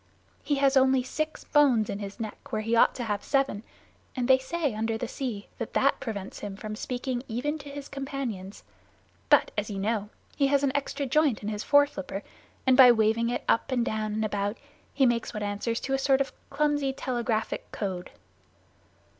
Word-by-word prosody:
He 290 - +1
has 275 0 +3
only 265 -1 +4
six 310 +4 -3
bones 265 -8 +4
in 200 - -4
his 200 +2 -7
neck 220 -2 -7
where 215 - -1
he 225 +2 +1
ought 230 - +5
to 245 - -3
have 205 -3 -2
seven, 270 -7 +1 0.5
and 250 -2 -1
they 260 0 +6
say 290 0 -2
under 220 +1 -1
the 245 - -3
sea 230 -6 -5
that - - -4
that - - +3
prevents 205 -4 -5
him 205 -2 -6
from 215 +1 -6
speaking 245 +2 -3
even 290 +7 -2
to 285 0 -10
his 280 0 -7
companions. 270 -9 -5 0.7
But, - - +5
as 210 0 -2
you 200 - -4
know, 210 +1 -1 0.3
he 275 - +3
has 280 0 +2
an 275 - +3
extra 285 0 -1
joint 275 -4 +2
in 210 - -2
his 210 -1 -3
foreflipper, 285 -9 +2 0.4
and 260 -1 +5
by 255 -2 +9
waving 225 +1 +2
it 245 - -2
up 230 - +2
and 245 -2 +1
down 215 -2 -2
and 220 +1 0
about 205 +1 -2 0.3
he 270 - +3
makes 235 -3 0
what 210 - -3
answers 205 +3 -2
to 270 - -2
a 270 - +2
sort 270 0 +3
of 275 - -1 0.2
clumsy 290 -1 +1
telegraphic 240 -4 -2
code. 185 -3 -4
240 Hz, 195 wpm, -27 LUFS, 215-275 Hz, 0.7 s, by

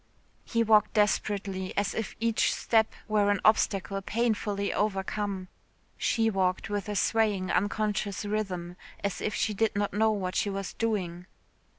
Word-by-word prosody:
He 230 0 +1
walked 215 -2 +4
desperately, 200 -2 0
as 200 0 +1
if 220 -3 -4
each 230 -1 +2
step 220 -1 +2 0.2
were 210 -2 +2
an 205 -1 +2
obstacle 195 -2 +2
painfully 210 -2 -1
overcome. 200 -1 -1 0.5
She 225 -1 +1
walked 190 -1 0
with 205 +1 -2
a 205 - -2
swaying 205 -3 +1
unconscious 205 +1 0
rhythm, 185 -4 -3 0.3
as 200 -2 -2
if 210 - -1
she 215 - 0
did 220 +1 +1
not 205 0 -1
know 220 +2 +3
what 190 -4 -1
she 205 - +1
was 195 0 -4
doing. 185 -6 -2
205 Hz, 150 wpm, -28 LUFS, 195-215 Hz, 0.5 s, walked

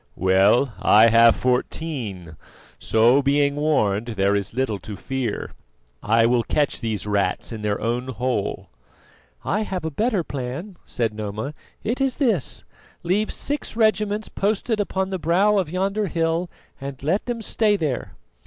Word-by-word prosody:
"Well, 100 +7 +3
I 110 +3 +6
have 115 0 +6
fourteen; 125 - -2 0.4
so, 120 +5 +4
being 140 +1 +2
warned, 120 -8 +1
there 100 +1 +3
is 100 -2 -2
little 125 -6 -1
to 105 0 -8
fear. 130 -1 -3 0.5
I 115 +2 +3
will 120 0 +3
catch 145 +4 -1
these 110 -4 -3
rats 100 +2 -1
in 110 -2 -6
their 105 -1 -1
own 120 +3 -2
hole." 125 - -3 0.7
"I 210 +4 0
have 185 -5 -3
a 160 - -2
better 210 - 0
plan," 140 +8 -6
said 115 -3 -1
Noma; 110 +6 -5 0.3
"it 235 +5 -2
is 270 -2 +1
this: 225 - 0 0.4
leave 195 +5 0
six 290 -5 -3
regiments 215 -1 +1
posted 210 +2 -1
upon 190 -1 -1
the 190 - -2
brow 195 +6 +3
of 180 -5 -2
yonder 195 +4 -1
hill 165 +1 -1 0.3
and 135 -1 -7
let 180 - 0
them 235 -2 -3
stay 215 0 +2
there. 150 -9 -3
140 Hz, 150 wpm, -23 LUFS, -, 0.7 s, I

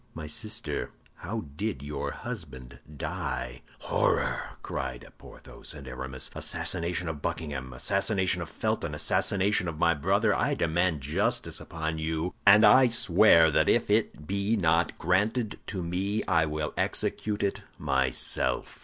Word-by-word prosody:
My 80 -1 -6
sister, 105 -2 -2 0.3
how 110 +3 -5
did 100 -6 -3
your 75 +1 -4
husband 65 -1 -8 0.2
die?" 60 -2 -4 0.2
"Horror!" - - 0
cried - - -5
Porthos - - -9
and 70 -3 -10
Aramis. 65 +1 -6
"Assassin 85 - -2 0.2
of 80 -3 -5
Buckingham, 70 -6 -4
assassin 100 - 0 0.2
of 85 - -6
Felton, - - -2
assassin 95 -2 0 0.2
of 80 -2 -4
my 85 +1 +3
brother, 70 - +2
I - - +1
demand 85 -1 +1
justice 70 +4 0
upon 80 -1 -4
you, 80 +2 -2
and 105 +2 +8
I 130 0 +7
swear 90 -7 +5
that - - +3
if - - +2
it 75 - +1
be 100 +5 0
not 85 -3 +1
granted 105 +6 0
to 95 -4 -4
me, 95 +5 -1
I 80 -3 +2
will 75 0 -3
execute 105 -1 -1
it 100 - -1 0.2
myself." 65 -1 0
80 Hz, 135 wpm, -28 LUFS, 75-100 Hz, 0.3 s, and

